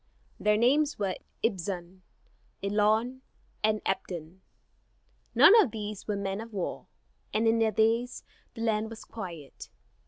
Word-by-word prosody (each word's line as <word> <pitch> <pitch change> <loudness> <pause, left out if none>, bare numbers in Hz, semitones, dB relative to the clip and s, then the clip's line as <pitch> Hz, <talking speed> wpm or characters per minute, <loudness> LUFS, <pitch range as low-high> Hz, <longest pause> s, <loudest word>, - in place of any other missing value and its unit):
Their 210 0 +3
names 285 +6 +3
were 195 -2 0 0.3
Ibzan, 185 -3 -2 0.6
Elon, 215 +5 +1 0.4
and 215 0 +2
Abdon. 180 -1 -4 0.9
None 405 - +9
of 275 - +1
these 210 -2 -6
were 210 - 0
men 195 +1 -3
of 230 0 -9
war, 190 -4 -4 0.5
and 225 +1 +3
in 225 0 +3
their 225 -1 +3
days 230 +3 +1 0.3
the 225 - -6
land 220 -1 0
was 225 -1 -10
quiet. 170 -10 -8
215 Hz, 130 wpm, -29 LUFS, 195-225 Hz, 0.9 s, None